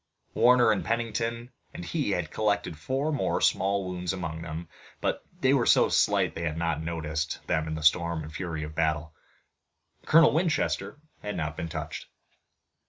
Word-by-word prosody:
Warner 125 0 +5
and - - 0
Pennington 115 +1 -2 0.2
and 175 - -6
he 150 -9 -1
had 90 -5 -1
collected 100 -5 0
four 135 - -2
more 145 - 0
small 100 0 +1
wounds 90 -1 -3
among 80 -3 -5
them, 80 0 -6 0.3
but - - -1 0.2
they - - +4
were - - +2
so - - +5
slight - - +2
that - - -6
they 85 - -1
had 75 +1 -3
not 80 -2 -1
noticed 80 -1 -3
them 80 0 0
in 80 - -3
the 80 - -6
storm 85 +1 +2
and 75 +1 -9
fury 80 -3 -4
of 75 - -6
the - - -16
battle. 75 -1 0 0.9
Colonel 165 -1 +6
Winchester 160 -3 0 0.2
had 105 0 -4
not 75 0 -3
been 85 - -4
touched. 80 -1 -6
85 Hz, 175 wpm, -28 LUFS, 80-115 Hz, 0.9 s, Colonel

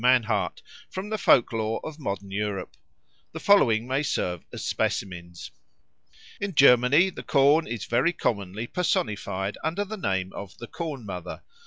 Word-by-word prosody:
Mannhardt 120 -4 +2 0.3
from 190 +2 -6
the 215 - -1
folk 120 - +4
lore 110 0 -1
of 155 0 -7
modern 100 - -4
Europe. 100 -2 -3 0.6
The - - -5
following 120 - +4
may 135 +2 0
serve 90 - -2
as - - -6
specimens. 85 -2 -3 0.9
In 200 -4 -3
Germany 140 +7 +6
the - - -8
corn 145 +4 +3
is 115 -3 -4
very 125 +9 +2
commonly 100 - -2
personified 105 - -1
under 170 +6 -1
the 215 +2 -6
name 95 - -2
of 100 -2 -8
the 120 - -8
Corn 145 -3 -6
mother. 90 -4 -7
120 Hz, 150 wpm, -26 LUFS, 100-155 Hz, 0.9 s, Germany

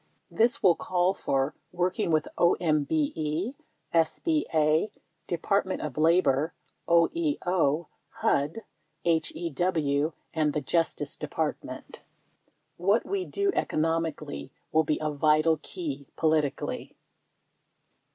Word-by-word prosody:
This 240 +5 +2
will 180 - +7
call 180 +2 +1
for 135 -4 0 0.2
working 180 +3 0
with 155 -1 +2
OMBE, 155 - +1 0.4
SBA, 165 - +2 0.4
Department 190 +2 0
of 150 -4 -4
La 165 +3 +5
bor, 145 +2 +1 0.3
OEO, 170 - +2 0.2
HUD, 150 +10 0 0.4
HEW 160 -2 0 0.2
and 155 -2 +1
the 150 - -1
Justice 165 +1 0
Department. - - -4 0.8
What 200 +6 +2
we 390 -2 -2
do 400 0 0
economically 155 -3 -1 0.2
will 160 0 +4
be 150 0 0
a 155 -1 -1
vital 155 +2 +3
key 145 -7 -5
politically. 155 -3 0
160 Hz, 95 wpm, -28 LUFS, 150-180 Hz, 0.8 s, will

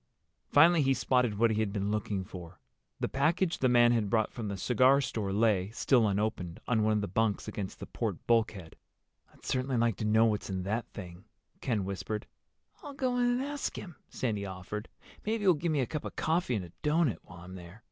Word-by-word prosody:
Finally 165 +3 +6
he 135 -1 +3
spotted 125 -6 +1
what 115 +1 +3
he 110 - 0
had 110 -2 0
been 100 0 -2
looking 105 -2 -2
for. 90 -2 -10 0.4
The - - 0
package 165 +6 +1
the 130 - +3
man 120 -1 +5
had 110 -4 +1
brought 110 0 +1
from 115 -3 -5
the 100 -1 -4
cigar 130 +6 +4
store 110 -7 -2
lay, 100 -2 +2
still 115 0 +3
unopened, 100 -4 -2
on 115 -3 +2
one 110 0 +2
of 105 - +1
the 100 - -2
bunks 105 +2 0
against 100 -2 -5
the - - -6
port - - -3
bulkhead. 110 -8 0 0.6
"I'd - - -20
certainly 130 0 -1
like 115 -4 +1
to 110 - -3
know 110 +1 +4
what's 105 -2 -1
in 95 -1 -3
that 110 +5 -2
thing," 90 -2 -10 0.4
Ken 110 -7 -1
whispered. 100 +2 -4 0.6
"I'll 290 -5 -9
go 255 -2 0
in 245 - +3
and 245 +2 +1
ask 290 0 -3
him," 175 -5 -8
Sandy 110 -5 -2
offered. 100 +3 -6 0.3
"Maybe 220 0 -1
he'll 190 -2 +6
give 165 +2 -2
me 145 -3 +1
a - - +1
cup 150 +4 -5
of - - -7
coffee 160 -5 0
and 95 -4 -3
a 85 - -14
doughnut 150 - +1
while 90 -1 -13
I'm 90 +1 -10
there. 90 +3 -11
110 Hz, 215 wpm, -30 LUFS, 100-135 Hz, 0.6 s, Finally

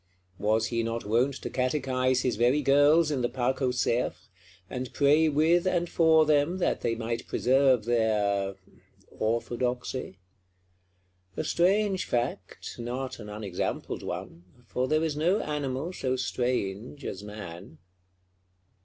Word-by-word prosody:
Was 110 +2 +1
he 115 - +1
not 115 0 -3
wont 120 +6 +1
to - - -3
catechise 130 -1 +1
his 125 - 0
very 125 +7 +2
girls 145 +3 +5
in 135 -3 -1
the 120 - 0
Parc 130 +2 -1
aux 130 - +2
cerfs, 125 -2 -1 0.4
and 125 +3 -5
pray 150 +3 +4
with 160 +5 +3
and 175 -2 +1
for 160 -2 +4
them, 150 +4 +2
that 185 - 0
they 115 - 0
might 115 0 -4
preserve 130 -2 +3
their—orthodoxy? 110 +2 -2 1.2
A - - -1
strange 195 +2 +2
fact, 120 0 -3
not 125 +2 -4
an 105 -2 -8
unexampled 105 -3 -4
one; 90 +8 -8
for 125 +3 -2
there 155 +2 +2
is 160 -2 -1
no 175 +7 +2
animal 150 +1 -3
so 130 -6 -1
strange 125 -1 -2
as 95 - -5
man. 95 -5 -9
125 Hz, 130 wpm, -28 LUFS, 115-150 Hz, 1.2 s, girls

